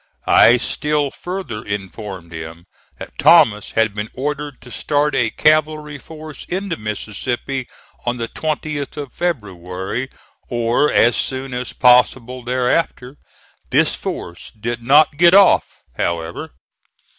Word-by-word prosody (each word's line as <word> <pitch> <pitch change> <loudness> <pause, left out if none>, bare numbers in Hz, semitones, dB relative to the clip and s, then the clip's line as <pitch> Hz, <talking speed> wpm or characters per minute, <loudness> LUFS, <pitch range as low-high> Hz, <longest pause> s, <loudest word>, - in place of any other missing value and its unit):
I 120 - +6
still 150 +2 -1
further 180 - -6
informed 95 -3 -6
him 80 +1 -8 0.3
that - - -10
Thomas 105 -1 +5
had 110 -2 +2
been 105 +1 -4
ordered 145 0 -4
to 125 - -13
start 145 +5 0
a 120 -4 +2
cavalry 155 +1 +1
force 155 -2 -10
into 190 0 -2
Mississippi 120 +5 -4 0.4
on 120 0 -1
the 115 -1 -3
20th 150 -1 -4
of 145 -3 -6
February, 105 - -3 0.4
or 120 +4 +1
as 120 +1 +4
soon 130 0 -2
as 125 0 -4
possible 125 0 +3
thereafter. 125 +2 -1 0.5
This - - +3
force 85 0 -6
did 120 +2 -3
not 145 +4 +4
get 175 +3 +6
off 200 -1 +4
however. 85 -1 -3
125 Hz, 120 wpm, -19 LUFS, 110-150 Hz, 0.5 s, I